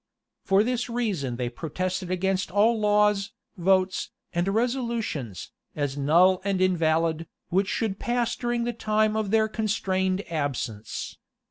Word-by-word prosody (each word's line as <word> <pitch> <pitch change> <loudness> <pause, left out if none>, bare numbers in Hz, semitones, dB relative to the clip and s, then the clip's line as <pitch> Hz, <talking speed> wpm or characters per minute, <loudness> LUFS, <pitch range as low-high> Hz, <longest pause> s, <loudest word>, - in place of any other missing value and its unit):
For 195 +2 +4
this 245 +1 -1
reason 200 - -1
they 125 0 -2
protested 180 +7 -3
against 185 +1 0
all 220 +4 +3
laws, 210 -1 +2 0.2
votes, 185 +1 +1 0.2
and 175 +2 0
resolutions, 225 - -2 0.2
as 145 -2 -2
null 175 +6 +4
and 195 -1 0
invalid, 165 -3 +1 0.2
which 190 +2 +2
should 205 -2 -2
pass 240 -1 0
during 240 -1 -1
the 240 0 -1
time 215 -1 +1
of 215 -2 -1
their 220 +1 +3
constrained 195 -3 -1
absence. 135 -9 -4
190 Hz, 130 wpm, -26 LUFS, 165-220 Hz, 0.2 s, For